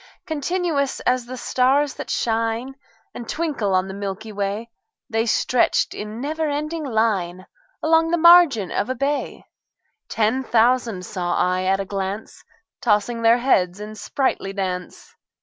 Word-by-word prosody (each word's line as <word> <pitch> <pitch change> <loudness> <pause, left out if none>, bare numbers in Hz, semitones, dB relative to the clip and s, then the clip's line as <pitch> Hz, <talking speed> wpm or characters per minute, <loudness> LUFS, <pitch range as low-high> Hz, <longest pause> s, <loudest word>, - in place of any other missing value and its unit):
Continuous 315 -3 -1
as 250 -1 0
the 255 +1 -7
stars 265 +4 +2
that - - -8
shine 230 +3 -1 0.4
And 235 - -8
twinkle 280 - -1
on 185 +1 +1
the 190 - -6
milky 200 +2 -5
way, 205 +3 -3 0.4
The 225 +1 0
stretched 245 +2 +2
in 210 +2 -6
never 310 +3 -2
ending 305 +3 -3
line 205 -8 -1 0.4
Along 325 +1 +3
the 345 - +2
margin 335 - +6
of 205 - -1
a 255 - -1
bay: 280 +3 -2 0.7
Ten 225 +4 +1
thousand 235 -5 +2
saw 175 -2 -2
I 185 +1 +1
at 195 +1 +2
a 195 - -2
glance, 195 +2 -5 0.4
Tossing 230 +1 +1
their 230 +1 +5
heads 195 -8 +1
in 210 +1 -7
sprightly 215 -3 -2
dance. 185 - -5
230 Hz, 145 wpm, -22 LUFS, 200-280 Hz, 0.7 s, margin